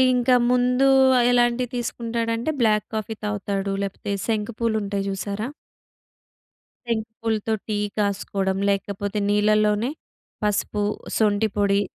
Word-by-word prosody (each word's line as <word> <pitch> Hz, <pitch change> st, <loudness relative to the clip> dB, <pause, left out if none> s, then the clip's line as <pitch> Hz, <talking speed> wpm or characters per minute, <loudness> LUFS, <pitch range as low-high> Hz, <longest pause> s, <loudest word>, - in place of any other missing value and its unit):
ఇంకా 250 Hz, +1 st, +3 dB
ముందు 250 Hz, +1 st, +3 dB, 0.3 s
ఆహ్, 240 Hz, -, +4 dB
ఎలాంటివి 240 Hz, 0 st, +2 dB
తీసుకుంటాడంటే 230 Hz, +2 st, -2 dB
బ్లాక్ 215 Hz, -2 st, +3 dB
కాఫీ 220 Hz, +1 st, -3 dB
తాగుతాడు. 200 Hz, -1 st, -2 dB
లేపోతే 200 Hz, +1 st, -4 dB, 0.2 s
శంకు 220 Hz, 0 st, -1 dB
పూలుంటాయి 205 Hz, -3 st, -1 dB
చూసారా? 200 Hz, +3 st, -3 dB, 1.4 s
శంకు 220 Hz, -1 st, -2 dB
పూలతో 220 Hz, -1 st, 0 dB
టీ 215 Hz, -, -1 dB, 0.2 s
కాసుకోడం, 195 Hz, -2 st, -1 dB
లేకపోతే 200 Hz, +1 st, -2 dB
నీళ్లలోనే 210 Hz, +2 st, +3 dB, 0.5 s
పసుపు, 210 Hz, 0 st, 0 dB, 0.4 s
సొంఠి 215 Hz, 0 st, +2 dB
పొడి 200 Hz, -1 st, +2 dB
215 Hz, 105 wpm, -23 LUFS, 200-230 Hz, 1.4 s, ఆహ్